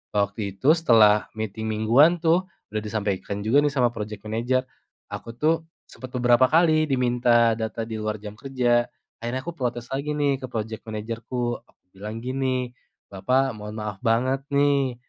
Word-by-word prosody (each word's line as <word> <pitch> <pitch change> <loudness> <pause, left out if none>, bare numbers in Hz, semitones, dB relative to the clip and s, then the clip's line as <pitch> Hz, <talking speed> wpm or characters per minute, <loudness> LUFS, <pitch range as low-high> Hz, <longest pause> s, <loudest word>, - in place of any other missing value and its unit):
waktu 100 -1 -1
itu 135 +9 +4
setelah 115 -10 +5
meeting 110 0 -4
mingguan 125 +11 +4
tuh, 170 +3 +3 0.2
udah 110 - -1
disampaikan 100 -1 -3
juga 115 +7 +4
nih 145 -1 +1
sama 125 -4 +2
project 105 -3 -7
manager. 120 +4 0 0.5
Aku 115 0 -7
tuh 160 +4 +1 0.2
sempat 130 -1 -11
beberapa 120 +1 +4
kali 155 0 +3
diminta 120 -3 +3
data 110 +1 -3
di 110 -1 -5
luar 105 0 -2
jam 105 0 -9
kerja, 120 -1 +1 0.3
akhirnya 120 +3 -3
aku 170 - -4
protes 125 -6 -4
lagi 140 +3 -2
nih 140 -2 +1
ke 130 - -6
project 110 -2 -5
manager-ku. 115 +3 -3
Aku 120 - -32
bilang 105 +4 -7
gini, 130 -1 -1 0.4
"Bapak 130 +8 +1
mohon 105 -1 -8
maaf 105 -3 -5
banget 130 +4 0
nih, 140 -2 +2
120 Hz, 160 wpm, -24 LUFS, 110-135 Hz, 0.5 s, setelah